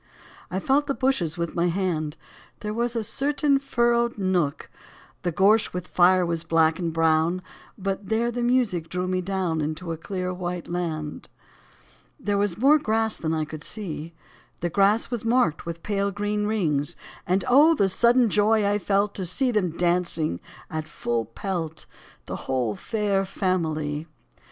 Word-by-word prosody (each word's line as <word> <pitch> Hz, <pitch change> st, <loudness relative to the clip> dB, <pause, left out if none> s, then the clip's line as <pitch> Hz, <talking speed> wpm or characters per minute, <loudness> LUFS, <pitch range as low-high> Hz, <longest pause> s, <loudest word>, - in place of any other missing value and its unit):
I 185 Hz, -, -2 dB
felt 280 Hz, +7 st, +2 dB
the 275 Hz, -, 0 dB
bushes 185 Hz, -, 0 dB
with 170 Hz, -1 st, -2 dB
my 175 Hz, 0 st, +1 dB
hand: 165 Hz, -4 st, -1 dB, 0.4 s
There 210 Hz, 0 st, -3 dB
was 235 Hz, +1 st, -1 dB
a 230 Hz, -, 0 dB
certain 285 Hz, +4 st, +1 dB
furrowed 235 Hz, -3 st, +1 dB
nook 180 Hz, -7 st, 0 dB, 0.3 s
— -, -, -26 dB
The 175 Hz, -, -1 dB
gorse 205 Hz, +6 st, +3 dB
with 180 Hz, 0 st, -4 dB
fire 180 Hz, 0 st, +4 dB
was 170 Hz, -1 st, -2 dB
black 160 Hz, 0 st, +2 dB
and 170 Hz, -2 st, -1 dB
brown. 165 Hz, +2 st, +2 dB, 0.3 s
But 195 Hz, 0 st, -3 dB
there 230 Hz, +2 st, +1 dB
the 240 Hz, +1 st, -3 dB
music 240 Hz, -9 st, +1 dB
drew 180 Hz, 0 st, -2 dB
me 185 Hz, 0 st, 0 dB
down 180 Hz, -4 st, -1 dB
Into 155 Hz, +3 st, -3 dB
a 165 Hz, -, -3 dB
clear, 185 Hz, +2 st, -3 dB
white 180 Hz, -1 st, -4 dB
land. 160 Hz, -4 st, -4 dB, 0.9 s
There 205 Hz, -6 st, 0 dB
was 200 Hz, -4 st, 0 dB
more 280 Hz, +6 st, +5 dB
grass 225 Hz, -5 st, +1 dB
than 160 Hz, -, -3 dB
I 155 Hz, -1 st, -1 dB
could 150 Hz, 0 st, -8 dB
see, 170 Hz, -6 st, -6 dB, 0.5 s
The 175 Hz, 0 st, -1 dB
grass 205 Hz, +5 st, +3 dB
was 240 Hz, -3 st, -2 dB
marked 230 Hz, -10 st, +1 dB
with 165 Hz, 0 st, -6 dB
pale, 200 Hz, -1 st, 0 dB
green 205 Hz, +1 st, -1 dB
rings; 165 Hz, -7 st, 0 dB, 0.3 s
And 185 Hz, +1 st, +1 dB
oh, 300 Hz, +6 st, +6 dB
the 200 Hz, -, +3 dB
sudden 235 Hz, +5 st, +4 dB
joy 210 Hz, +1 st, +3 dB
I 205 Hz, +1 st, +2 dB
felt 200 Hz, +1 st, +1 dB
To 190 Hz, -, -3 dB
see 250 Hz, +9 st, +2 dB
them 210 Hz, -6 st, +1 dB
dancing 170 Hz, -, 0 dB, 0.3 s
at 155 Hz, 0 st, -3 dB
full 120 Hz, -5 st, -2 dB
pelt, 160 Hz, -, -4 dB, 0.4 s
The -, -, -5 dB
whole 125 Hz, -5 st, 0 dB
Fair 205 Hz, -, 0 dB
Family. 160 Hz, -5 st, -1 dB
185 Hz, 165 wpm, -25 LUFS, 165-215 Hz, 0.9 s, oh